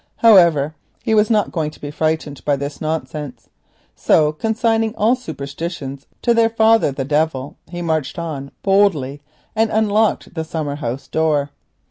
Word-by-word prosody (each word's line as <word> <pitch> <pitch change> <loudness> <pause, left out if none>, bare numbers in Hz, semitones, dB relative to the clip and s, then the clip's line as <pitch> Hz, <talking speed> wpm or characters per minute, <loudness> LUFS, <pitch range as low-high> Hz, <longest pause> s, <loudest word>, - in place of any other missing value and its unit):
However, 170 -9 +5 0.3
he 220 - 0
was 215 0 +4
not 215 -3 +2
going 160 -3 -1
to 150 - -16
be 145 - -6
frightened 155 -2 -2
by 145 - +2
this 140 +1 -6
nonsense, 150 -5 -4 0.5
so 150 -1 +3
consigning 225 +5 0
all 225 +4 +3
superstitions 140 - -6 0.2
to 235 - +4
their 230 -1 +4
father 225 -6 +3
the 135 0 -4
Devil, 145 -2 -1
he 175 0 -5
marched 160 -2 -1
on 150 -5 -5
boldly 175 -9 +2 0.3
and 220 0 +2
unlocked 215 0 +1
the 160 -2 -3
summer 155 -3 -4
house 135 -1 -4
door. 150 -3 0
160 Hz, 150 wpm, -19 LUFS, 145-210 Hz, 0.5 s, However